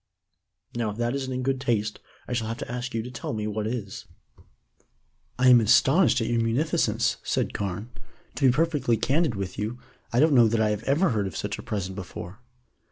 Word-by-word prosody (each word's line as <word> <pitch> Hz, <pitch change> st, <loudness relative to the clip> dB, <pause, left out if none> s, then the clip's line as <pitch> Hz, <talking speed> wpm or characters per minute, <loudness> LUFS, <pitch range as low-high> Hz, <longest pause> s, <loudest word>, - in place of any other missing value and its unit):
Now, 120 Hz, -2 st, -1 dB
if 105 Hz, -, -6 dB
that 120 Hz, +1 st, 0 dB
isn't 135 Hz, -1 st, -3 dB
in 130 Hz, 0 st, -2 dB
good 135 Hz, 0 st, -1 dB
taste, 110 Hz, -5 st, -1 dB, 0.3 s
I -, -, -3 dB
shall 115 Hz, -2 st, -1 dB
have 115 Hz, +1 st, -4 dB
to 115 Hz, -, -6 dB
ask 125 Hz, 0 st, -4 dB
you 115 Hz, -, -1 dB
to 125 Hz, -, -8 dB
tell 120 Hz, -, -5 dB
me 105 Hz, -1 st, -3 dB
what 105 Hz, 0 st, -2 dB
is." 110 Hz, -4 st, -5 dB, 1.3 s
"I 130 Hz, 0 st, +5 dB
am 120 Hz, -2 st, +8 dB
astonished 130 Hz, -, +4 dB
at -, -, 0 dB
your 120 Hz, -1 st, +1 dB
munificence," 120 Hz, +8 st, +1 dB
said -, -, -1 dB
Carne. 100 Hz, +4 st, -4 dB, 0.4 s
"To 135 Hz, -, +2 dB
be -, -, +6 dB
perfectly 145 Hz, -5 st, +1 dB
candid 145 Hz, 0 st, +1 dB
with 95 Hz, -1 st, -5 dB
you, 110 Hz, +4 st, -3 dB, 0.3 s
I 120 Hz, -, +2 dB
don't 155 Hz, +1 st, +5 dB
know 120 Hz, -3 st, +6 dB
that 115 Hz, +1 st, +1 dB
I 110 Hz, -1 st, +2 dB
have 105 Hz, 0 st, -2 dB
ever 160 Hz, +7 st, +3 dB
heard 105 Hz, -4 st, 0 dB
of -, -, -6 dB
such 105 Hz, +1 st, -3 dB
a -, -, -5 dB
present 95 Hz, -3 st, -4 dB
before." 95 Hz, +1 st, -8 dB
115 Hz, 210 wpm, -26 LUFS, 105-130 Hz, 1.3 s, am